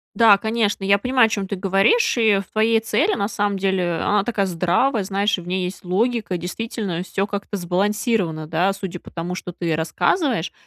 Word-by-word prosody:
Да, 220 Hz, -2 st, +7 dB
конечно, 220 Hz, -2 st, -1 dB
я 200 Hz, +1 st, +4 dB
понимаю, 250 Hz, +2 st, +3 dB
о -, -, -3 dB
чем 200 Hz, -3 st, -2 dB
ты 200 Hz, -, -3 dB
говоришь. 195 Hz, -, +2 dB
И 215 Hz, -3 st, +4 dB
в -, -, -7 dB
твоей 225 Hz, +1 st, +3 dB
цели, 220 Hz, -1 st, +1 dB
на 200 Hz, -2 st, -1 dB
самом 205 Hz, -2 st, -1 dB
деле, 190 Hz, -3 st, 0 dB
она 205 Hz, +4 st, +1 dB
такая 215 Hz, -4 st, 0 dB
здравая, 190 Hz, +7 st, +1 dB
знаешь, 200 Hz, +1 st, 0 dB
и -, -, -5 dB
в 175 Hz, -, -11 dB
ней 185 Hz, 0 st, -1 dB
есть 180 Hz, +1 st, -6 dB
логика. 215 Hz, +1 st, 0 dB
Действительно, 180 Hz, 0 st, -4 dB
всё 195 Hz, +1 st, -2 dB
как-то 205 Hz, 0 st, -5 dB
сбалансировано, 185 Hz, -2 st, -1 dB
да, 170 Hz, +5 st, +1 dB
судя 190 Hz, -3 st, -6 dB
по -, -, -14 dB
тому, 175 Hz, +1 st, -5 dB
что 180 Hz, -1 st, -6 dB
ты 170 Hz, -2 st, -2 dB
рассказываешь. 200 Hz, -, 0 dB
195 Hz, 195 wpm, -21 LUFS, 180-220 Hz, -, Да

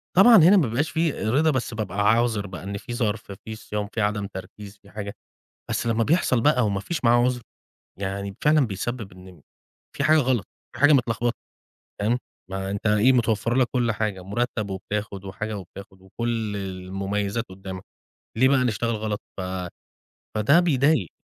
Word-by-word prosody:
طبعًا 225 Hz, +6 st, +8 dB
هنا 185 Hz, +3 st, +7 dB
ما 160 Hz, -9 st, +3 dB
بيبقاش 130 Hz, +8 st, 0 dB
فيه 160 Hz, -9 st, 0 dB
رضا 150 Hz, +7 st, +3 dB
بس 130 Hz, -3 st, -2 dB
بابقى 105 Hz, -3 st, -4 dB
عاذر 115 Hz, -3 st, +1 dB
بقى 95 Hz, -1 st, -8 dB
إن 100 Hz, +1 st, -4 dB
في 120 Hz, +4 st, -7 dB
ظَرف، 110 Hz, -3 st, -2 dB
في 110 Hz, -, -6 dB
صيام، 105 Hz, -1 st, -4 dB
في 115 Hz, -, -1 dB
عدم 105 Hz, -1 st, 0 dB
تركيز، 100 Hz, +1 st, -10 dB
في 100 Hz, -, -18 dB
حاجة، 100 Hz, -1 st, -6 dB, 0.6 s
بس -, -, -1 dB
لمّا 115 Hz, 0 st, +2 dB
بيحصل 145 Hz, -5 st, +2 dB
بقى 125 Hz, -3 st, +3 dB
وما 100 Hz, -2 st, 0 dB
فيش 165 Hz, -, -4 dB
معاه 120 Hz, +1 st, +5 dB
عذر، 125 Hz, -1 st, 0 dB, 0.6 s
يعني 100 Hz, 0 st, -4 dB
فعلًا 150 Hz, -3 st, +4 dB
بيسبب 105 Hz, +2 st, -4 dB
إن 90 Hz, -3 st, -14 dB, 0.6 s
في 140 Hz, -, 0 dB
حاجة 155 Hz, +2 st, +5 dB
غلط، 125 Hz, -7 st, +1 dB, 0.3 s
في 120 Hz, -, -8 dB
حاجة 145 Hz, +1 st, +7 dB
متلخبطة، 120 Hz, -2 st, +1 dB, 0.6 s
تمام 115 Hz, +4 st, +1 dB, 0.3 s
ما 95 Hz, 0 st, -3 dB
أنت 100 Hz, +2 st, -3 dB
إيه 105 Hz, +4 st, +5 dB
متوفَّر 115 Hz, -2 st, +1 dB
لك 130 Hz, -1 st, +4 dB
كل 120 Hz, -3 st, +1 dB
حاجة، 105 Hz, -3 st, -2 dB
مُرتب 105 Hz, +1 st, -2 dB
وبتاخد 100 Hz, +1 st, -4 dB
وحاجة 105 Hz, +2 st, -4 dB
وبتاخد 95 Hz, +1 st, -12 dB
وكل 110 Hz, +2 st, -3 dB
المميزات 100 Hz, +3 st, -3 dB
قدامك، 95 Hz, 0 st, -8 dB, 0.5 s
ليه 130 Hz, +3 st, +5 dB
بقى 135 Hz, -2 st, +3 dB
نشتغل 115 Hz, 0 st, 0 dB
غلط؟ 105 Hz, -1 st, -3 dB, 0.2 s
ف -, -, -2 dB, 0.9 s
فده 125 Hz, +10 st, +5 dB
بيضايق. 145 Hz, -, +2 dB
110 Hz, 170 wpm, -24 LUFS, 100-125 Hz, 0.9 s, طبعًا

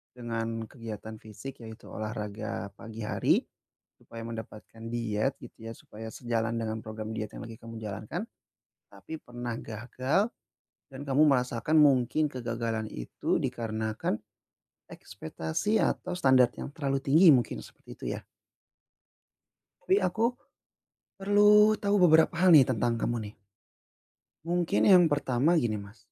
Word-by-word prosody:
dengan 115 Hz, -1 st, -3 dB
kegiatan 110 Hz, -3 st, -8 dB
fisik, 110 Hz, +6 st, -10 dB
yaitu 110 Hz, +1 st, -11 dB
olahraga 105 Hz, -1 st, -5 dB
pagi 115 Hz, -1 st, -8 dB
hari -, -, +2 dB, 0.6 s
supaya 115 Hz, 0 st, -10 dB
mendapatkan 115 Hz, 0 st, -9 dB
diet, 115 Hz, +2 st, -1 dB
gitu 115 Hz, 0 st, -11 dB
ya, -, -, -5 dB
supaya 110 Hz, +1 st, -10 dB
sejalan 115 Hz, -1 st, -2 dB
dengan 110 Hz, -1 st, -2 dB
program 110 Hz, 0 st, -7 dB
diet 110 Hz, -2 st, -5 dB
yang -, -, -7 dB
lagi 115 Hz, -1 st, -10 dB
kamu 115 Hz, 0 st, -10 dB
jalankan, 110 Hz, -, -5 dB, 0.7 s
tapi 160 Hz, -1 st, -9 dB
pernah 120 Hz, -1 st, -6 dB
gagal 130 Hz, -, -1 dB, 0.6 s
dan 135 Hz, +1 st, -8 dB
kamu 140 Hz, +1 st, +2 dB
merasakan 125 Hz, +2 st, +1 dB
mungkin 145 Hz, +1 st, +4 dB
kegagalan 115 Hz, -3 st, -3 dB
itu -, -, -2 dB
dikarenakan 110 Hz, -1 st, -2 dB, 0.7 s
ekspektasi 80 Hz, -, -2 dB
atau 180 Hz, -, -1 dB
standar 130 Hz, -7 st, +4 dB
yang -, -, -7 dB
terlalu 135 Hz, -2 st, -2 dB
tinggi, 160 Hz, +7 st, +5 dB
mungkin 120 Hz, -4 st, 0 dB
seperti -, -, -17 dB
itu -, -, -10 dB
ya? -, -, -8 dB, 1.7 s
Tapi 190 Hz, -, +4 dB
aku 220 Hz, +6 st, 0 dB, 0.9 s
perlu 210 Hz, +2 st, +6 dB
tau 200 Hz, 0 st, +2 dB
beberapa 160 Hz, -1 st, +6 dB
hal 185 Hz, -, +6 dB
nih 135 Hz, -, +8 dB
tentang 120 Hz, +1 st, +1 dB
kamu 120 Hz, -, 0 dB
nih. -, -, -16 dB, 1.1 s
Mungkin 175 Hz, 0 st, +1 dB
yang 180 Hz, -5 st, +7 dB
pertama, 145 Hz, +3 st, +2 dB
gini, 110 Hz, -6 st, 0 dB
Mas. 100 Hz, +3 st, -13 dB
120 Hz, 130 wpm, -29 LUFS, 110-145 Hz, 1.7 s, nih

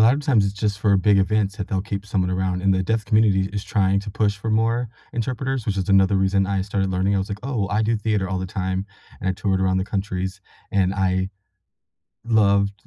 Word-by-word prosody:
lot 115 Hz, +3 st, +6 dB
of 145 Hz, -, -3 dB
times, 130 Hz, -8 st, +3 dB
it's 100 Hz, -, -1 dB
just 105 Hz, -1 st, -2 dB
for 100 Hz, -2 st, +4 dB
big 100 Hz, +2 st, +3 dB
events 100 Hz, +1 st, +1 dB
that 100 Hz, -, -5 dB
they'll 95 Hz, -2 st, 0 dB
keep 100 Hz, 0 st, -5 dB
someone 95 Hz, -3 st, -1 dB
around, 90 Hz, 0 st, -1 dB
and 95 Hz, 0 st, +2 dB
the 95 Hz, -, +1 dB
deaf 110 Hz, +3 st, -1 dB
community 105 Hz, -4 st, +3 dB
is 100 Hz, -1 st, -3 dB
trying 100 Hz, -1 st, +1 dB
to 100 Hz, -, -7 dB
push 105 Hz, 0 st, 0 dB
for 110 Hz, +2 st, -4 dB
more 115 Hz, +2 st, +1 dB, 0.2 s
interpreters, 130 Hz, +1 st, -2 dB
which 100 Hz, -2 st, -1 dB
is 95 Hz, -, -2 dB
another 95 Hz, 0 st, +4 dB
reason 95 Hz, 0 st, +2 dB
I 95 Hz, -1 st, 0 dB
started 95 Hz, -1 st, -1 dB
learning. 95 Hz, +2 st, +1 dB
I 100 Hz, -, +2 dB
was, 95 Hz, -, -3 dB
like, 100 Hz, -1 st, -4 dB
"Oh, 115 Hz, -8 st, -1 dB
I 105 Hz, +2 st, +1 dB
do 115 Hz, +1 st, +1 dB
theater 105 Hz, -3 st, -1 dB
all 95 Hz, 0 st, -2 dB
the 95 Hz, -, -3 dB
time," 95 Hz, +1 st, -2 dB, 0.4 s
and 95 Hz, -, -2 dB
I -, -, +2 dB
toured 95 Hz, 0 st, -1 dB
around 95 Hz, 0 st, +2 dB
the 95 Hz, -, -1 dB
countries. 95 Hz, -1 st, -3 dB, 0.3 s
And 95 Hz, -1 st, +2 dB
I 95 Hz, -1 st, 0 dB, 1.0 s
loved 100 Hz, -3 st, +3 dB
100 Hz, 235 wpm, -22 LUFS, 95-105 Hz, 1.0 s, lot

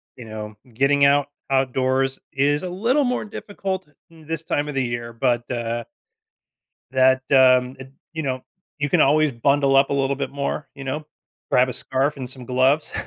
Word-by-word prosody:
you 120 Hz, -, -10 dB
know, 110 Hz, -1 st, -7 dB, 0.2 s
getting 140 Hz, +3 st, +3 dB
out 140 Hz, 0 st, +4 dB, 0.2 s
outdoors 130 Hz, 0 st, +1 dB
is 145 Hz, +3 st, +1 dB
a 180 Hz, -, -3 dB
little 230 Hz, +11 st, +1 dB
more 250 Hz, -3 st, -1 dB
difficult 195 Hz, -4 st, -5 dB, 0.2 s
in 165 Hz, -2 st, -17 dB
this 165 Hz, 0 st, -4 dB
time 145 Hz, -2 st, -1 dB
of 150 Hz, -, -5 dB
the 135 Hz, -, +1 dB
year, 120 Hz, -1 st, -4 dB
but, 120 Hz, 0 st, 0 dB
uh 120 Hz, -1 st, -2 dB, 1.1 s
that, 130 Hz, 0 st, +4 dB
um, 130 Hz, -1 st, +5 dB
eh 130 Hz, -, -8 dB, 0.3 s
you 160 Hz, -, -3 dB
know, 130 Hz, -3 st, -3 dB, 0.4 s
you 145 Hz, 0 st, 0 dB
can -, -, +3 dB
always 150 Hz, +1 st, +4 dB
bundle 140 Hz, +3 st, +2 dB
up 135 Hz, 0 st, +5 dB
a -, -, +1 dB
little 140 Hz, 0 st, 0 dB
bit 140 Hz, -, -3 dB
more. 140 Hz, +1 st, -3 dB
You 140 Hz, -, -9 dB
know? 150 Hz, +3 st, -4 dB, 0.4 s
Grab 125 Hz, +1 st, +4 dB
a -, -, -2 dB
scarf 135 Hz, +4 st, -1 dB
and 130 Hz, -2 st, -6 dB
some 130 Hz, 0 st, -7 dB
gloves. 130 Hz, +4 st, +2 dB
135 Hz, 185 wpm, -22 LUFS, 130-145 Hz, 1.1 s, um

